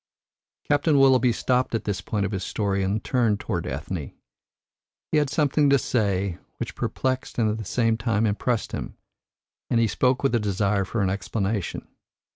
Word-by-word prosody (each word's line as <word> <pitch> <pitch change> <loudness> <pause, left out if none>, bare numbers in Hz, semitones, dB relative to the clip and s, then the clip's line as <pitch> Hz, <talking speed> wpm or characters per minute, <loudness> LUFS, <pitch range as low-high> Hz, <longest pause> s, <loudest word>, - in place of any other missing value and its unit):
Captain 145 +1 +3
Willoughby 130 -2 +5
stopped 125 +1 0
at 115 - -1
this 105 -2 -2
point 105 -2 -1
of 100 - -3
his 95 -2 -3
story 100 -1 -1
and 100 +3 -1
turned 115 -5 +1
towards 90 -7 -3
Ethne. - - -5 1.0
He 155 - +3
had 145 -2 +1
something 145 -1 +2
to 140 - +6
say 100 -8 0 0.2
which - - -4
perplexed 130 0 -2
and 115 -3 +3
at 110 - -3
the 110 - -6
same 115 +2 +1
time 115 -1 +1
impressed 110 +2 -1
him, - - -6 0.7
and 115 - +2
he 115 - +4
spoke 125 +4 +1
with 135 - +2
a 120 - +3
desire 100 -1 0
for 105 +2 -1
an 95 - +1
explanation. 100 0 -2
110 Hz, 175 wpm, -25 LUFS, 100-130 Hz, 1.0 s, to